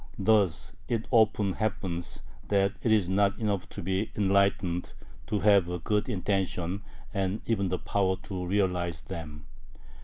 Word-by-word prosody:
Thus 100 -6 +2
it 115 -1 -1
often 110 -4 +3
happens 90 -5 -3 0.2
that 100 -1 +2
it 115 - +1
is 105 -5 +4
not 100 +2 +2
enough 105 -5 -1
to - - -7
be 95 +4 -1
enlightened, 100 -3 +1 0.3
to 105 -2 -1
have 90 -5 +3
good 105 +2 0
intentions, 95 -1 -1 0.3
and 100 +1 -1
even 100 -5 0
the 90 - 0
power 95 -1 0
to 95 -2 -4
realize 90 -3 0
them. 75 -5 -7
95 Hz, 140 wpm, -29 LUFS, 90-105 Hz, 0.3 s, is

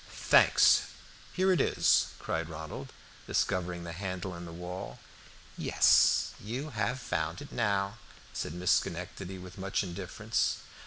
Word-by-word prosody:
"Thanks; - - +5 0.5
here 190 +1 +2
it 180 - +3
is," - - +3
cried 80 0 -3
Ronald, 80 -1 -7 0.4
discovering 90 -2 -1
the 85 - -6
handle 95 +1 -4
in 85 0 -8
the 85 - -8
wall. 90 +2 -7 0.6
"Yes, - - +4
you 130 +8 -4
have 110 +2 -1
found 80 -6 -2
it 145 - -10
now," 100 -1 0 0.3
said 80 - -4
Miss 90 0 +1
Schenectady 95 +1 -2
with 90 +1 -11
much 95 +2 -1
indifference. 85 -3 -2
90 Hz, 135 wpm, -30 LUFS, 85-105 Hz, 0.6 s, Thanks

